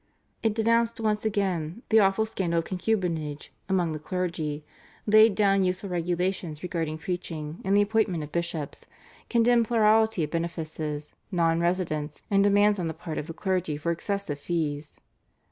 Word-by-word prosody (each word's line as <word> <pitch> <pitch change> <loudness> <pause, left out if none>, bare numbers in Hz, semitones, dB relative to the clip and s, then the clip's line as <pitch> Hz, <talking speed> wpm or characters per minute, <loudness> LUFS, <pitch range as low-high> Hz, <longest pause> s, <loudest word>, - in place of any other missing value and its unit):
It 220 -2 +1
denounced 230 +1 +2
once 215 -1 0
again 195 - -1
the 220 - +6
awful 195 +2 +3
scandal 185 -6 -1
of 165 - 0
concubinage 175 -7 -2 0.2
among 180 -4 +1
the 155 - -4
clergy, 160 -3 -3 0.4
laid 215 0 +6
down 195 -2 +3
useful 185 +1 -1
regulations 175 -2 -2
regarding 165 -3 -2
preaching 165 -2 -5
and 195 +1 +3
the 205 - +6
appointment 205 -6 0
of 150 - -9
bishops, 170 -4 -4 0.4
condemned 235 0 +4
plurality 220 -4 +3
of 150 - -3
benefices, 160 -3 -4 0.2
nonresidence, 170 -2 0
and 200 0 +4
demands 205 0 +4
on 175 - -1
the 160 - -4
part 160 -1 -5
of 150 - -6
the 165 - -6
clergy 180 -6 -1
for 170 +3 -1
excessive 185 -3 -3
fees. 150 -2 -3
180 Hz, 150 wpm, -27 LUFS, 160-205 Hz, 0.4 s, the